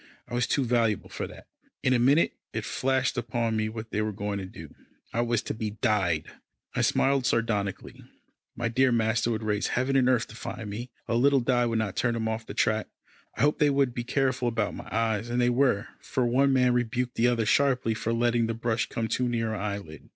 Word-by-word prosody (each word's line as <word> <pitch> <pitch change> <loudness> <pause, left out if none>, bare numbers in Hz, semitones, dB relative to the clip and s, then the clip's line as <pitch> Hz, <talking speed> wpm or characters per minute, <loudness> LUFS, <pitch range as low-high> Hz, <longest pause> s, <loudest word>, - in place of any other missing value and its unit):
I 120 - -10
was 120 0 +1
too 140 - +1
valuable 115 -4 +1
for - - -4
that. - - -13 0.4
In 130 -2 +3
a 125 - +3
minute, 140 +7 +4 0.2
it - - -3
flashed 130 -1 0
upon 115 -1 -1
me 110 0 0
what 110 0 -7
they 105 - 0
were 110 0 -1
going 100 0 -3
to 95 - -6
do. 80 -5 -11 0.4
I 115 - +1
was 120 -2 0
to - - -3
be 110 -1 -4
dyed. 90 -7 +1 0.5
I - - 0
smiled 135 -2 +2
sardonically. 105 -4 -1 0.5
My 115 0 -1
dear 130 +3 +3
master 115 0 +1
would 110 -1 -2
raise 105 -1 0
heaven 130 +2 0
and 130 -1 +4
earth 125 -3 +2
to 110 - -11
find 110 -2 -6
me. 120 +5 -5 0.2
A - - -1
little 135 +4 +4
dye 120 -1 +2
would 115 -1 0
not 110 -3 -1
turn 120 -2 +1
him 110 -1 -2
off 110 0 -3
the - - -7
track. 110 0 +1 0.5
I - - -2
hoped 150 +1 +3
they 150 - +4
would 135 -3 +2
be 120 - -3
careful 130 0 0
about 115 -3 0
my - - -8
eyes, 110 0 0
and 120 +1 0
they 120 0 +3
were, 125 -4 +2
for 130 - -1
one 135 +3 +3
man 125 -2 +4
rebuked 120 +1 -1
the 115 - +2
other 120 -2 +1
sharply, 125 -2 +2
for 110 +1 -2
letting 120 0 +2
the 115 - -2
brush 115 0 -1
come 115 -1 -2
too 125 +2 0
near 115 -2 -1
an 105 - -4
eyelid. 100 -7 -6
115 Hz, 225 wpm, -27 LUFS, 110-125 Hz, 0.5 s, minute